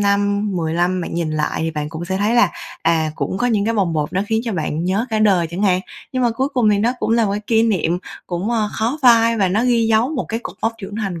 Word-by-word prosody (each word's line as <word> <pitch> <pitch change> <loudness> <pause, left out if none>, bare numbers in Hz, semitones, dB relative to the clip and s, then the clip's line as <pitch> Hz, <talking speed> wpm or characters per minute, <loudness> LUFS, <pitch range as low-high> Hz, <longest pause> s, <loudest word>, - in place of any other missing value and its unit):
năm, 200 0 +1
10 160 -1 -1
lăm 180 +2 +1
bạn 170 - -5
nhìn 170 -2 -1
lại 155 -1 -1
thì 160 - -1
bạn 150 -1 -4
cũng 160 +2 -6
sẽ 190 +2 -2
thấy 210 +4 +1
là, 245 - +4 0.3
à, 160 -1 +2
cũng 190 - -3
có 245 - +1
những 215 -4 +1
cái 230 +2 0
bồng 190 -6 +1
bột 150 -2 -2
nó 190 - 0
khiến 220 +1 0
cho 230 - -2
bạn 160 -2 -2
nhớ 195 +7 0
cả 220 - 0
đời 195 -6 +3
chẳng 175 +4 -4
hạn. 185 -3 +3 0.3
Nhưng 255 -1 0
mà 240 - +3
cuối 260 +4 -1
cùng 245 -6 +2
thì 205 - +2
nó 230 +4 +2
cũng - - -2
là 230 -1 +3
một 200 - -1
kỷ 225 -1 +3
niệm 180 -6 +1 0.3
cũng, 180 +5 -3
ơ, 220 -3 +1
khó 235 +7 -1
phai 230 -2 +5
và 195 -4 +2
nó 210 +6 +1
ghi 235 -2 +2
dấu 225 +2 +3
một 260 - -2
cái 225 +1 -3
cột - - -8
mốc 225 - +1
trưởng 205 -1 -7
thành 195 -6 -3
205 Hz, 285 wpm, -19 LUFS, 175-230 Hz, 0.3 s, phai